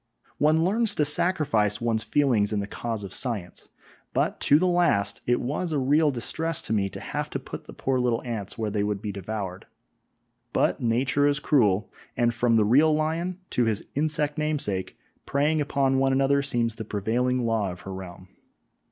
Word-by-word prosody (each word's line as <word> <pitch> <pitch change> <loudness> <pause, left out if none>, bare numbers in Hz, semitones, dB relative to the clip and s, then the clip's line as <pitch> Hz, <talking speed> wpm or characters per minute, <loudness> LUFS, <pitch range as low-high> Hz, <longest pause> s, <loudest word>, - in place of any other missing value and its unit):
One 155 +2 +4
learns 220 +5 +1
to 150 - +2
sacrifice 145 - +1
one's 115 -2 0
feelings 120 -8 +2
in 105 - 0
the 100 - -2
cause 110 0 -4
of 95 -2 -7
science, 110 -9 -4 0.5
but - - 0
to 145 - +5
the 180 - +1
last 170 - +2
it 120 0 +3
was 150 +7 -2
a 150 - 0
real 145 +3 +3
distress 160 +5 -2
to - - -2
me 100 -2 +1
to - - -8
have - - -4
to - - -3
put - - -8
the - - -11
poor 130 -1 -1
little 120 -2 0
ants 110 -5 -5
where 110 -2 -2
they 100 -1 0
would 105 -1 -1
be 105 0 -4
devoured; 100 -1 -5 0.9
but - - +1
Nature 130 +5 +2
is 145 0 +1
cruel, 110 -10 +2 0.3
and 120 -1 +2
from 120 0 +2
the 110 -2 +4
real 145 +9 +5
lion 165 +4 -2
to 120 - +2
his 110 -2 -1
insect 150 0 0
namesake, 145 -12 -2 0.3
preying 150 +3 +1
upon 135 -2 +1
one 135 0 +2
another 135 +1 +3
seems 120 -4 0
the 110 - -4
prevailing 120 +5 0
law 110 -4 0
of 90 - -10
her 95 - -7
realm. 90 -1 -9
125 Hz, 185 wpm, -26 LUFS, 105-150 Hz, 0.9 s, to